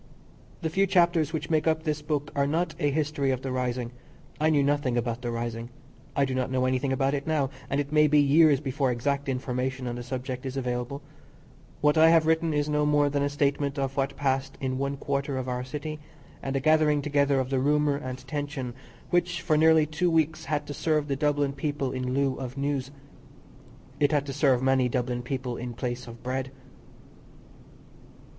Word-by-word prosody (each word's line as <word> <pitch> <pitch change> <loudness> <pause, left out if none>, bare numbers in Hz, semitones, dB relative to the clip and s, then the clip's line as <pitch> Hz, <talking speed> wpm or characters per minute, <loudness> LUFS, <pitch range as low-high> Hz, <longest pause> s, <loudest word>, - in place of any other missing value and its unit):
The 160 - 0
few 195 +3 +2
chapters 170 -4 +3
which 160 0 -4
make 155 0 +2
up 160 0 +1
this 150 -2 -1
book 150 -1 -2
are 140 0 +2
not 160 +2 0
a 145 -4 +2
history 145 -1 0
of 130 -1 -1
the 135 - -3
rising. 125 -1 -2 0.5
I 155 +1 +3
knew 145 -3 +3
nothing 140 -3 +1
about 120 0 -2
the 120 - -3
rising. 115 0 -4 0.5
I 140 - +3
do 130 - -3
not 130 0 -1
know 130 0 +1
anything 130 +1 0
about 135 +1 +1
it 140 +1 -3
now, 145 -4 +1 0.2
and 140 - 0
it 145 0 -3
may 150 0 +5
be 150 0 +4
years 145 0 +5
before 135 -1 -1
exact 140 +3 -1
information 130 0 -2
on 120 - -2
the - - -5
subject 130 +1 -5
is 135 0 -4
available. 125 +2 -3 0.8
What 150 +1 +4
I 160 +1 +8
have 165 -1 +5
written 160 0 +2
is 145 -1 0
no 150 0 +1
more 145 -1 +3
than 140 0 0
a 140 - +1
statement 140 0 0
of 135 -1 -2
what 140 0 -1
passed 135 -1 -1
in 130 -1 -2
one 140 0 -2
quarter 140 0 -2
of 130 -1 -3
our 125 0 -2
city, 150 +4 -5 0.4
and 135 0 -3
a - - +2
gathering 150 0 +3
together 140 -1 +2
of 130 0 -2
the 135 - +2
rumour 145 +1 +2
and 130 -2 -5
tension 145 -4 -4 0.4
which 175 0 +1
for 155 - +1
nearly 160 0 +5
two 155 +4 0
weeks 160 -1 +1
had 150 0 -1
to 145 - -6
serve 150 0 0
the 140 - +1
Dublin 145 -1 +1
people 140 -1 -2
in 130 0 -2
lieu 135 -1 +1
of 130 0 -6
news. 140 -1 -1 1.1
It 145 -1 +3
had 145 -2 +1
to 140 - -5
serve 135 -3 +2
many 130 -1 +3
Dublin 125 0 -1
people 125 -1 -4
in 120 -1 -6
place 125 0 -4
of 115 0 -11
bread. 130 +1 -2
140 Hz, 205 wpm, -27 LUFS, 130-150 Hz, 1.1 s, I